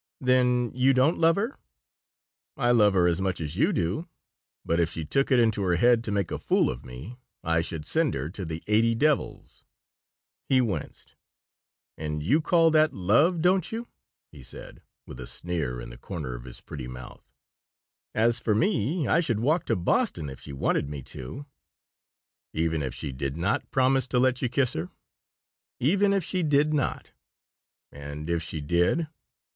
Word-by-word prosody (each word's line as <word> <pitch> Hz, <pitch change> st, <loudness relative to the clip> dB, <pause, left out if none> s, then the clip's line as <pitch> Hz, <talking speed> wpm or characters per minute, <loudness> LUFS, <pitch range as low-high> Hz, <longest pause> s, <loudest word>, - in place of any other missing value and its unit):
"Then 125 Hz, -1 st, +2 dB
you 130 Hz, +1 st, +3 dB
don't 135 Hz, +6 st, +3 dB
love 165 Hz, 0 st, +5 dB
her." 225 Hz, +6 st, -3 dB, 1.0 s
"I 120 Hz, -, +2 dB
love 105 Hz, -4 st, +4 dB
her 90 Hz, -2 st, +4 dB
as 90 Hz, +1 st, +1 dB
much 95 Hz, -2 st, -1 dB
as 75 Hz, -3 st, -4 dB
you -, -, +2 dB
do, 95 Hz, -, -1 dB, 0.6 s
but 85 Hz, +1 st, +1 dB
if 85 Hz, -1 st, +2 dB
she 80 Hz, -2 st, -5 dB
took 135 Hz, -, +1 dB
it 130 Hz, -, +5 dB
into 110 Hz, -3 st, +2 dB
her 90 Hz, -3 st, +2 dB
head 120 Hz, +5 st, +4 dB
to 105 Hz, -, -3 dB
make 100 Hz, -3 st, -1 dB
a -, -, -3 dB
fool -, -, +2 dB
of -, -, -8 dB
me 65 Hz, -, -9 dB, 0.3 s
I 80 Hz, 0 st, +2 dB
should 80 Hz, -2 st, -6 dB
send 160 Hz, -, +1 dB
her 70 Hz, +2 st, -3 dB
to 95 Hz, -, -6 dB
the 80 Hz, -1 st, -5 dB
eighty 115 Hz, +2 st, +3 dB
devils." 150 Hz, +3 st, -1 dB, 0.9 s
He 130 Hz, -, +4 dB
winced. 100 Hz, -, -3 dB, 0.9 s
"And 75 Hz, -1 st, -3 dB
you 140 Hz, -, +3 dB
call 165 Hz, 0 st, +4 dB
that 155 Hz, 0 st, +3 dB
love, 140 Hz, -, +3 dB
don't 180 Hz, -1 st, +2 dB
you?" 230 Hz, +1 st, -5 dB, 0.4 s
he -, -, -13 dB
said, 65 Hz, -, -11 dB, 0.2 s
with 65 Hz, -, -10 dB
a 60 Hz, -, -7 dB
sneer 80 Hz, -8 st, -3 dB
in -, -, -8 dB
the -, -, -12 dB
corner 75 Hz, -7 st, -5 dB
of -, -, -8 dB
his 60 Hz, -, -9 dB
pretty 65 Hz, -4 st, -7 dB
mouth. 65 Hz, 0 st, -11 dB, 0.9 s
"As 115 Hz, +2 st, +3 dB
for 110 Hz, -3 st, +1 dB
me, 155 Hz, -, +1 dB
I 170 Hz, -, +3 dB
should 125 Hz, -11 st, 0 dB
walk 150 Hz, +8 st, +1 dB
to -, -, +2 dB
Boston, 80 Hz, -4 st, 0 dB
if 65 Hz, -, -10 dB
she -, -, -10 dB
wanted 70 Hz, +1 st, 0 dB
me 70 Hz, -2 st, -6 dB
to." 65 Hz, -, -8 dB, 1.1 s
"Even 80 Hz, 0 st, 0 dB
if 65 Hz, -3 st, -4 dB
she -, -, -4 dB
did 70 Hz, +2 st, -4 dB
not 95 Hz, +5 st, -1 dB
promise 130 Hz, 0 st, +2 dB
to 125 Hz, -, -1 dB
let 130 Hz, 0 st, +2 dB
you 125 Hz, -, 0 dB
kiss 130 Hz, 0 st, +1 dB
her?" 80 Hz, +3 st, -4 dB, 0.9 s
"Even 195 Hz, +9 st, +3 dB
if 195 Hz, -2 st, +1 dB
she 185 Hz, +3 st, -1 dB
did 150 Hz, -1 st, +2 dB
not." 145 Hz, -3 st, -2 dB, 0.8 s
"And 70 Hz, +3 st, -6 dB
if 85 Hz, -1 st, 0 dB
she 80 Hz, -2 st, -5 dB
did?" 90 Hz, -, +1 dB
105 Hz, 180 wpm, -27 LUFS, -, 1.1 s, love